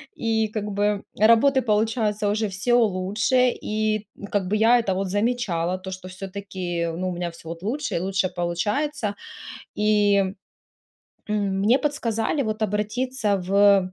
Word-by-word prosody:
и 220 -1 0
как 210 -1 -4
бы 205 0 0 0.2
работы 230 +5 +5
получается 215 -1 +1
уже 215 +1 0
всё 200 +6 -1
лучше. 220 +4 +2
И, 215 -2 -2
м, 200 - -9
как 195 -3 -1
бы 210 - 0
я 230 +3 +5
это 195 -5 0
вот 195 +1 -2
замечала, 195 -5 0
то 190 - -8
что 185 0 -8
всё-таки, 185 -2 -4
ну, 185 +1 -2
у - - -3
меня 175 -1 -3
всё 165 -1 -14
вот 165 +2 -7
лучше 280 +8 -2
и - - +1
лучше 190 0 0
получается. 210 - -2 0.6
И, 210 -1 +3 1.1
м, 200 -2 0
мне 235 +7 +4
подсказали 275 -2 -1
вот 215 -1 -3
обратиться 215 +2 0
в 195 0 +4
210 Hz, 150 wpm, -24 LUFS, 190-225 Hz, 1.1 s, работы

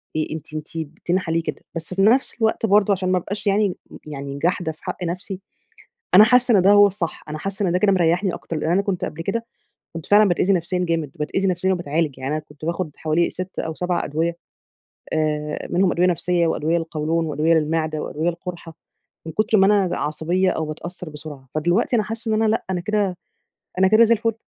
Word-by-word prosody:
إيه، 155 0 -1
أنتِ 155 - -10
أنتِ 155 0 -5 0.4
تنحة 180 -1 0
ليه 165 0 +1
كده، - - -5
بس 165 +2 -5
في 195 - 0
نفس 235 +7 +4
الوقت 220 0 +2
برضه 205 -1 +4
عشان 185 -1 -1
ما 185 - +3
أبقاش 200 +4 -4
يعني 200 -1 +2 0.3
يعني 140 -1 -6
جاحدة 175 0 0
في 155 - -19
حق - - -5
نفسي، 180 +2 -4 0.8
أنا 210 +3 +10
حاسة 250 -1 +4
إن 185 - +4
ده 195 - +5
هو 205 0 +8
الصح، 185 -4 -3
أنا 155 +1 -5
حاسة 195 +4 -2
إن - - 0
ده 180 - +2
كده 200 +1 +3
مريحني 175 +1 +2
أكتر، 165 - -6
لأن 155 +1 -1
أنا 195 +3 +3
كنت 195 -3 -2
قبل 165 - -5
كده 230 +6 -2 0.5
كنت 165 -2 -7
فعلًا 210 0 +6
باتأذي 180 +2 +2
نفسيًا 180 0 0
جامد، 165 -4 -1
باتأذي 175 +5 -1
نفسيًا 185 +1 +1
وباتعالج، 160 -5 -1
يعني 130 +2 -4
أنا 155 - -4
كنت 150 +1 -12
باخد 170 0 -2
حوالي 160 +2 +1
6 185 +1 -7
أو 160 -1 -3
7 180 0 -1
أدوية 165 +3 -1 0.8
آآ، 150 -1 -1
منهم 180 0 +2
أدوية 180 +1 +2
نفسية 175 0 +1
وأدوية 160 +1 +1
للقولون 165 0 -1
وأدوية 155 +2 +2
للمعدة 155 0 0
وأدوية 160 +3 -2
للقرحة، 170 -1 -6 0.5
من 160 - -5
كتر 215 +2 +2
ما 195 - +6
أنا 195 -3 +2
عصبيّة 175 +5 0
أو 160 - -2
باتأثر 175 +3 -7
بسرعة، 145 -3 -10
فدلوقتي 175 +10 +1
أنا 215 - +1
حاسة 225 +1 -5
إن 220 - +2
أنا 220 - +3
لأ، 225 - 0
أنا 180 -2 -1
كده 200 -1 0 0.6
أنا 190 - +5
كده 220 +3 +6
زي 230 - +4
الفل 230 0 0
175 Hz, 210 wpm, -22 LUFS, 160-195 Hz, 0.8 s, أنا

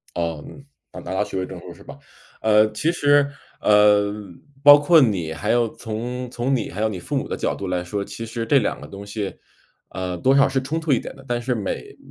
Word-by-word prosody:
哦， 85 -3 -2
嗯， 140 - -13 0.3
拿 - - -7
拿 - - -6
到 100 +2 +1
学 95 - -5
位 95 - -1
证 - - -9
书 - - -10
是 - - -16
吧？ - - -12 0.4
呃， 110 0 +4
其 150 +10 0
实， 145 -3 +3 0.3
呃， 105 -1 +4 0.5
包 145 0 +10
括 160 +2 +5
你 90 -10 0
还 105 +8 -2
有 120 -1 +3
从 120 +2 -5
从 130 +2 0
你， 115 - -2
还 100 +5 -5
有 110 - +2
你 95 -4 -5
父 - - -5
母 - - -2
的 - - -3
角 - - -1
度 100 - -6
来 90 -1 -1
说， 100 +3 -3
其 115 - -7
实 115 0 -4
这 140 +1 +4
两 105 - -2
个 - - -10
东 100 +1 -9
西， 100 -1 -5 0.5
呃， 90 -1 -4
多 130 +10 +3
少 140 - +5
是 135 -1 -1
冲 155 +5 -3
突 160 -2 -2
一 120 - +2
点 - - -8
的， 135 - -15
但 120 0 -1
是， 125 +1 -1
每 105 -4 -4
呃 - - -21
110 Hz, 265 characters per minute, -22 LUFS, 100-135 Hz, 0.5 s, 包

